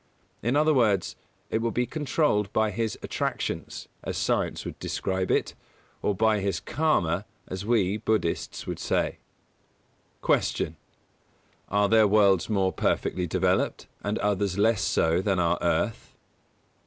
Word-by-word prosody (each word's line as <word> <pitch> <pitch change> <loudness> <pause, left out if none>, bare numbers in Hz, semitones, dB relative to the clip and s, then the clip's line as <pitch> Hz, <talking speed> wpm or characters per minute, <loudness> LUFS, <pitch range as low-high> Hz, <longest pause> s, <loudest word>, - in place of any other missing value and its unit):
In 120 +4 0
other 155 +1 +4
words, 105 -8 +2 0.4
it 110 - +1
will 115 - +1
be 125 +2 0
controlled 135 -7 0
by 110 -1 +1
his 110 +1 -2
attractions, - - -3 0.2
as - - -3
science - - 0
would - - -7
describe 95 0 -2
it; - - +1 0.5
or 105 - 0
by 110 +1 +3
his 95 -4 -1
Karma, 95 - +1 0.2
as 95 +2 -5
we, 105 -4 +2
Buddhists, 110 -5 -1
would - - -4
say. - - -1 1.0
144. - - +2
Q. 75 - -12 0.9
_Are 100 0 +3
there 110 0 +5
worlds 100 -3 +4
more 95 -3 +1
perfectly 90 -1 0
developed, 95 +2 0 0.2
and 105 +1 -1
others 100 -2 0
less 110 0 +3
so 80 +2 +2
than 95 -1 +1
our 85 0 +1
Earth? - - -1
105 Hz, 140 wpm, -27 LUFS, 95-110 Hz, 1.0 s, there